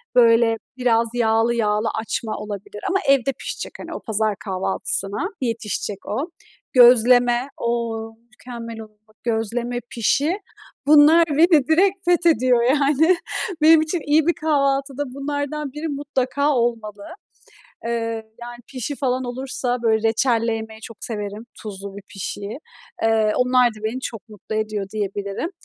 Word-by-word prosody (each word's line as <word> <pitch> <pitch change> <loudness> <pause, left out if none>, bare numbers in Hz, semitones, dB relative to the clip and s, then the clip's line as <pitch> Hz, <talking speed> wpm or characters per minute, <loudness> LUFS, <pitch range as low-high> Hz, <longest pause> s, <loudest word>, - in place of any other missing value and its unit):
Böyle, 230 -1 +5 0.2
biraz 235 -2 +2
yağlı 230 0 +2
yağlı 210 -1 +1
açma 220 0 -3
olabilir 210 0 -7
ama 385 +1 +2
evde 275 -1 +3
pişecek, - - -5
hani, - - -7
o - - -5
pazar 215 -2 -1
kahvaltısına 195 - 0
yetişecek 225 -4 -3
o. 275 - -3 0.4
Gözleme. 245 0 +6
O! 230 -1 -2 0.2
Mükemmel 235 -2 -9
olur, 215 -1 -14
bak; 215 - -26
gözleme 235 +1 -1
pişi... 290 - +1 0.5
Bunlar 305 +3 +7
beni 305 -2 +4
direkt 375 +4 +2
fethediyor 280 -9 +3
yani. 290 +6 +3 0.5
Benim 320 +1 +7
için 315 +3 -1
iyi 310 +1 +4
bir 345 - +4
kahvaltıda 275 -3 0
bunlardan 285 +1 -3
biri 300 +2 -4
mutlaka 280 -1 -1
olmalı. 225 -5 -2 0.8
Eee, 230 - -2 0.5
yani 240 0 -8
pişi 270 +1 -4
falan 260 -1 -1
olursa, 250 0 -3
böyle, 225 -1 +2
reçelle 230 0 +1
yemeyi 220 0 -7
çok 225 0 -10
severim 210 0 -4 0.2
tuzlu 200 -2 -8
bir 200 - -9
pişiyi. 200 +3 -6 0.4
Eee, 220 -1 +3
onlar 250 0 +4
da 215 -1 -13
beni 230 +4 -2
çok 225 -4 -7
mutlu 215 0 -8
ediyor 215 -2 -2
diyebilirim. 200 - -3
240 Hz, 135 wpm, -22 LUFS, 220-275 Hz, 0.8 s, Bunlar